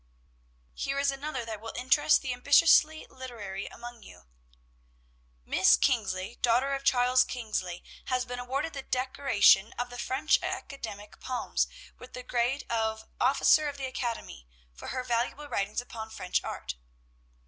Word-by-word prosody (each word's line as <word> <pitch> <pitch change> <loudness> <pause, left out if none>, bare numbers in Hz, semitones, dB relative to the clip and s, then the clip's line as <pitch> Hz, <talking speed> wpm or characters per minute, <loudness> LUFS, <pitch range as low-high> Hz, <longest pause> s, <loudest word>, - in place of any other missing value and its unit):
"Here 275 - -3
is 280 0 +2
another 275 -3 -4
that 220 -2 -6
will 225 0 -7
interest 295 +5 +3
the 260 -2 -2
ambitiously 305 +4 +5
literary 220 -7 -7
among 240 -1 -10
you: - - -15 1.2
"'Miss 185 - +5
Kingsley, 205 -4 0
daughter 250 +4 +2
of 275 0 -3
Charles 255 0 +4
Kingsley, 215 -9 -4 0.2
has 255 -1 0
been 245 0 -6
awarded 270 +6 -3
the 275 - -5
decoration 255 -6 +3
of 245 0 -4
the 245 - -8
French 275 +6 +1
academic 210 -7 -6
palms, 255 -1 -1 0.3
with 250 - -13
the 250 - -7
grade 245 +3 -1
of 220 -1 -1
"officer 290 +4 +4
of 285 - -8
the 270 - -4
academy," 235 - -5 0.3
for - - -10
her 255 0 -3
valuable 250 +4 -1
writings 205 -3 -1
upon 225 -2 -8
French 185 -4 -2
art.' - - -5
245 Hz, 145 wpm, -29 LUFS, 220-270 Hz, 1.2 s, ambitiously